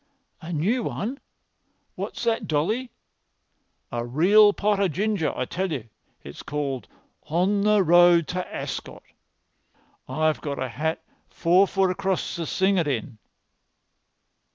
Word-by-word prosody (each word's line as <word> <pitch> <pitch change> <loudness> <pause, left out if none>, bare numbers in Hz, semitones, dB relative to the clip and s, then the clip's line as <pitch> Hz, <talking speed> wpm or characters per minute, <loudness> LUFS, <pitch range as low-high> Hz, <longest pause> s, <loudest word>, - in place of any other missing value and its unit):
"A 165 - -7
new 190 +11 0
one! 235 +5 -4 0.7
What's - - -6
that, 230 -1 0
Dolly?" 215 +12 0 1.0
"A 120 0 -2
real 185 - +5
pot 205 0 0
o' 200 - +3
ginger, 190 0 -1
I - - -1
tell 185 +1 -3
you. 120 -7 -5 0.3
It's - - -9
called 140 -3 -4 0.4
'On 185 +6 +1
the 210 -1 +4
Road 175 -1 +5
to 180 0 -2
Ascot.' - - -6 1.1
I've 155 0 0
got 140 -2 -4
a 130 - -3
hat 160 +8 -3 0.3
four 180 +3 +3
foot 190 -1 +1
across 190 0 -2
to 165 -2 -4
sing 190 0 +2
it 165 - 0
in." 115 -5 -3
175 Hz, 130 wpm, -25 LUFS, 150-200 Hz, 1.1 s, real